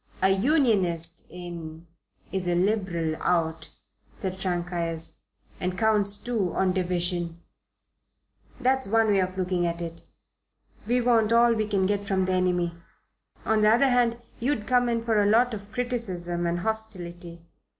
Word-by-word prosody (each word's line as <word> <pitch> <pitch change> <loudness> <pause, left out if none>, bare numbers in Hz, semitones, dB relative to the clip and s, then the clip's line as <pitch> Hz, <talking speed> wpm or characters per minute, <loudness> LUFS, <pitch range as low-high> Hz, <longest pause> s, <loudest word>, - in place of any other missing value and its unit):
"A 190 - +3
Unionist 195 - +1
in 170 -2 -8 0.5
is 190 -2 -2
a 175 - +2
Liberal 180 -4 0
out," 160 -2 0 0.4
said 190 -1 -4
Frank 175 -2 -2
Ayres, 165 -1 -3 0.4
"and 180 0 -2
counts 205 -2 +2
two 215 -7 -2
on 185 -1 +2
division. 175 -2 -1 1.2
That's 265 -1 +1
one 225 +1 +3
way 200 -1 +3
of 185 0 -1
looking 180 -1 0
at 170 0 -3
it. 170 -1 -6 0.9
We 245 +2 +2
want 230 -2 +3
all 235 0 +5
we 215 -2 -1
can 200 -3 +1
get 205 +1 0
from 190 -2 0
the 185 - 0
enemy. 180 -2 +1 0.7
On 220 -1 +2
the 210 - +5
other 245 +5 +4
hand, 240 -2 +2 0.2
you'd 235 -3 -1
come 245 0 +2
in 230 -1 -1
for 220 -2 +2
a 205 - +3
lot 235 +3 +4
of 205 -1 -8
criticism 190 -8 -2
and 175 +1 -1
hostility. 175 -6 -4
190 Hz, 150 wpm, -26 LUFS, 175-220 Hz, 1.2 s, all